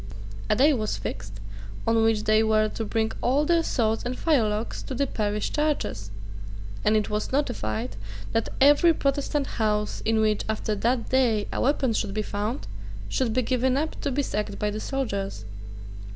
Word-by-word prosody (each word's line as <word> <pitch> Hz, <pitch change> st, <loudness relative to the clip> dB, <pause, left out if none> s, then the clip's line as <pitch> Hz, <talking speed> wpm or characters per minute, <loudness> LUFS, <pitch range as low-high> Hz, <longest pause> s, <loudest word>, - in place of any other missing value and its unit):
A -, -, +4 dB
day 285 Hz, +7 st, +5 dB
was 215 Hz, -5 st, -1 dB
fixed 100 Hz, -1 st, -6 dB, 0.5 s
on 225 Hz, 0 st, +3 dB
which 225 Hz, -1 st, +2 dB
they 215 Hz, 0 st, +4 dB
were 215 Hz, -1 st, +3 dB
to 225 Hz, -, -4 dB
bring 220 Hz, +1 st, 0 dB
all 275 Hz, +5 st, +2 dB
their 335 Hz, +1 st, +3 dB
swords 225 Hz, -8 st, 0 dB
and 250 Hz, +1 st, -3 dB
firelocks 225 Hz, -8 st, +1 dB
to 265 Hz, -, -4 dB
the 280 Hz, -, +1 dB
parish 210 Hz, -4 st, -2 dB
churches; 295 Hz, -, -1 dB, 0.7 s
and 215 Hz, +1 st, +4 dB
it 210 Hz, -, -1 dB
was 210 Hz, 0 st, -2 dB
notified 110 Hz, -, -2 dB, 0.3 s
that 225 Hz, -, 0 dB
every 290 Hz, +4 st, +6 dB
Protestant 280 Hz, +1 st, 0 dB, 0.2 s
house 210 Hz, -1 st, 0 dB
in 225 Hz, 0 st, +2 dB
which, 215 Hz, -1 st, +2 dB
after 215 Hz, 0 st, -1 dB
that 230 Hz, +3 st, 0 dB
day, 235 Hz, -6 st, +2 dB
a -, -, -1 dB
weapon 265 Hz, -3 st, +2 dB
should 210 Hz, -2 st, -2 dB
be 215 Hz, -, 0 dB
found 210 Hz, +6 st, -3 dB, 0.4 s
should 255 Hz, -4 st, 0 dB
be 255 Hz, +3 st, +1 dB
given 255 Hz, +2 st, +1 dB
up 310 Hz, +2 st, -2 dB
to 285 Hz, -, -1 dB
be 280 Hz, +2 st, 0 dB
sacked 210 Hz, -4 st, -3 dB
by 210 Hz, 0 st, -1 dB
the 215 Hz, -, -4 dB
soldiers. 200 Hz, -, -3 dB
225 Hz, 175 wpm, -26 LUFS, 210-270 Hz, 0.7 s, every